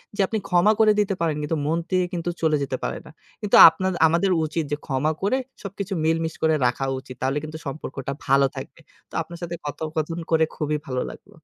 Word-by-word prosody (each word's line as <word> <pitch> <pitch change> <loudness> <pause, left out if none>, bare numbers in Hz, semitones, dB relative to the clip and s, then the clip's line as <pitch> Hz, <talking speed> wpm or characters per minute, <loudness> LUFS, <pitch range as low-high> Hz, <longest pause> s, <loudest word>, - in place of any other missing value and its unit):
যে - - -14
আপনি 220 - -2
ক্ষমা 180 +4 +4
করে 215 -1 +6
দিতে 200 -1 +1
পারেন 160 -3 +1
কিন্তু 155 +2 -1
মন 160 +2 +1
থেকে 185 -1 +2
কিন্তু 175 0 -2
চলে 155 -2 +3
যেতে 130 -1 -3
পারে - - -2
না। 150 - -12 0.3
কিন্তু 210 - +2
আপনার, 185 +3 -2 0.2
আমাদের 170 +4 +2
উচিত 160 +1 -2
যে 145 - 0
ক্ষমা 140 +3 0
করে 205 +7 +1 0.3
সবকিছু 200 0 -5
মিল 160 +1 +2
মিস 160 0 -3
করে 160 0 +3
রাখা 125 +2 0
উচিত। 130 -1 -11
তাহলে 135 +2 0
কিন্তু 155 +1 -6
সম্পর্কটা 135 -1 -5
ভালো 135 +1 +4
থাকবে। - - -8 0.3
তো - - -27
আপনার 170 - -8
সাথে 170 0 -4
কথোপকথন 155 +2 -3
করে 160 0 +4
খুবই 150 0 -1
ভালো 130 -1 -2
লাগল। - - -13
160 Hz, 210 wpm, -23 LUFS, 145-180 Hz, 0.3 s, করে